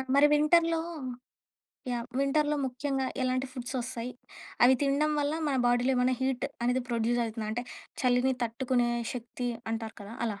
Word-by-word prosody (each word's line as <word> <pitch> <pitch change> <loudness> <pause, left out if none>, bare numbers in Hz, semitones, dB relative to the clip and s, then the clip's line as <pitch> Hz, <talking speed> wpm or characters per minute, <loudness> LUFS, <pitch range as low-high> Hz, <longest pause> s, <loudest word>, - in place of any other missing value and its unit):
మరి 290 +1 +7
వింటర్‌లో 330 +2 +4 1.1
యాహ్! 240 0 -2
వింటర్‌లో 295 +2 +2
ముఖ్యంగా 265 +1 -1 0.2
ఎలాంటి 255 +1 0
ఫుడ్సొస్తాయి? 250 -1 -4 0.5
అవి 260 +2 +7
తిండం 290 +2 +2
వల్ల, 290 +1 0
మన 275 -2 +1
బాడీలో 245 +2 +3
ఏమైనా 250 +1 +3
హీట్ 260 0 0 0.2
అనేది 250 +1 +2
ప్రొడ్యూజైతుందా? 230 -1 0
అంటే, 245 +2 -3 0.4
చలిని 250 +1 +3
తట్టుకునే 240 +1 0 0.2
శక్తి 245 0 -4 0.2
అంటారు 225 -1 -4
కదా! 205 +3 -9
అలా. 205 -2 -4
255 Hz, 135 wpm, -29 LUFS, 240-275 Hz, 1.1 s, మరి